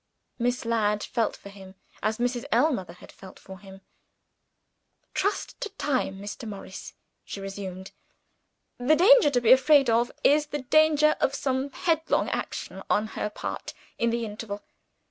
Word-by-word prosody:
Miss 245 0 -1
Ladd 210 -2 +1
felt 230 -3 -1
for 200 - -12
him, 190 -1 -13 0.3
as 215 +1 0
Mrs. 245 +1 -1
Ellmother 220 - +1
had - - -15
felt 190 -1 -14
for 190 -1 -12
him. 195 0 -13 1.3
"Trust 405 +2 -2
to - - -3
time, 255 -9 -1
Mr. 205 +3 -7
Morris," 195 -2 -9 0.3
she - - -7
resumed. 195 -1 -7 0.9
"The 260 +6 +4
danger 410 +1 +6
to 255 -3 +2
be 240 -1 +3
afraid 270 -1 +6
of 235 +2 +2
is 295 +1 +4
the 295 -2 -5
danger 305 +2 +4
of 275 - +1
some 265 0 -1
headlong 320 +2 0
action, - - -4
on 215 +1 +1
her 210 - -3
part, - - -6 0.2
in 235 - +2
the 235 0 -1
interval. 210 -1 -7
235 Hz, 150 wpm, -26 LUFS, 205-285 Hz, 1.3 s, danger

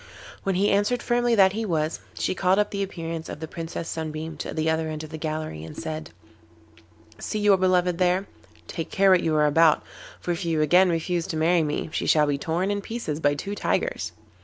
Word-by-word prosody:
When 195 -1 -1
he 200 +3 +2
answered 205 +5 +1
firmly 240 -1 +2
that 190 -2 +5
he 225 +2 -2
was, 160 -5 -1 0.2
she - - -1
called 185 0 +2
up 210 0 +1
the 200 - -2
appearance 165 -4 -4
of - - -6
the 160 - -5
Princess 165 +1 -6
Sunbeam 160 0 -4
to - - -5
the 155 0 -1
other 160 0 0
end 155 0 -5
of 155 - -9
the 160 - -5
gallery, 155 - -4
and 80 - -9
said: 155 0 -5
'You 85 -5 -27 0.4
see - - -3
your 205 -1 +5
beloved 180 -2 +2
there? 180 +2 +2 0.4
Take 165 - -5
care 195 0 +4
what 185 -2 +5
you 160 -1 0
are 150 0 +4
about, 155 +1 +4 0.4
for 175 - -3
if 170 +1 -2
you 165 -2 0
again 180 +5 +5
refuse 170 0 -1
to 160 - -3
marry 165 +2 +3
me 150 0 -2
she - - -1
shall 150 -1 +5
be 145 -1 -1
torn 175 +6 -1
in 205 0 -1
pieces 200 -9 -4
by 145 -2 +2
two 200 +8 -5
tigers. - - -1
165 Hz, 220 wpm, -25 LUFS, 155-190 Hz, 0.4 s, that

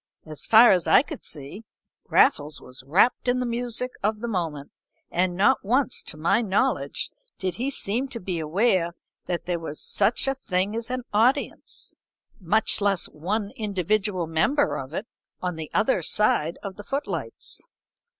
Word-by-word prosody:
As 155 -2 -4
far 230 +2 +8
as 180 -3 +2
I - - +6
could 310 -2 -8
see, 145 +7 -6 0.5
Raffles 150 - +3
was 125 +1 -11
wrapt 200 - +3
in 245 +1 +2
the 250 - -1
music 240 +1 -2
of 215 +1 0
the 235 - -4
moment, 165 -9 -3 0.4
and 180 0 +1
not 205 +8 +3
once, 250 +5 +1
to - - -6
my 165 +9 +2
knowledge, 220 +5 0 0.3
did 185 -1 -2
he 255 +4 -1
seem 250 0 0
to 255 -3 -6
be 180 -3 -3
aware 170 +2 +1 0.3
that 175 -1 -2
there 175 -1 -1
was 155 -2 -6
such 210 +6 +1
a 270 - +2
thing 200 -5 -1
as 230 +1 -3
an 255 0 -3
audience, 230 +6 0 0.5
much 210 +4 +2
less 200 -3 +1
one 200 +7 -3
individual 205 -3 -1
member 165 - +1
of 135 0 -7
it, 195 - -4 0.3
on 180 -1 -3
the 160 -1 -6
other 260 +5 +2
side 170 -6 +2
of 195 -1 -6
the 205 - -8
footlights. 195 - -4
200 Hz, 165 wpm, -25 LUFS, 170-235 Hz, 0.5 s, far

